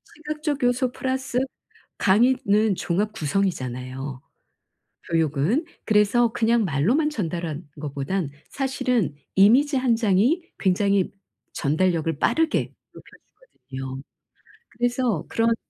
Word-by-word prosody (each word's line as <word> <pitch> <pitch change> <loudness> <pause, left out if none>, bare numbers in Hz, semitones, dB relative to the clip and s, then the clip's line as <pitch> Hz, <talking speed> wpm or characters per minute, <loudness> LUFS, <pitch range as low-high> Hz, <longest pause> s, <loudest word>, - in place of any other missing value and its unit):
시각적 300 -2 -3
요소 245 +1 +2
플러스 260 -1 -2 0.6
강의는 215 -1 +3
종합 205 +6 -1
구성이잖아요, 135 - -3 0.9
교육은. 165 - +1 0.2
그래서 220 +2 +3
그냥 230 0 +2
말로만 205 - +1
전달하는 170 - -4
것보단 145 +3 -3 0.2
사실은 255 - -1 0.2
이미지 255 +9 +5
1 255 -3 +2
장이 225 - +2 0.2
굉장히 195 0 +2 0.4
전달력을 165 0 0
빠르게 315 - +1 0.2
높여주거든요. 135 - -10 0.7
그래서 245 - -1
그런 230 0 +2
210 Hz, 250 characters per minute, -24 LUFS, 160-250 Hz, 0.9 s, 이미지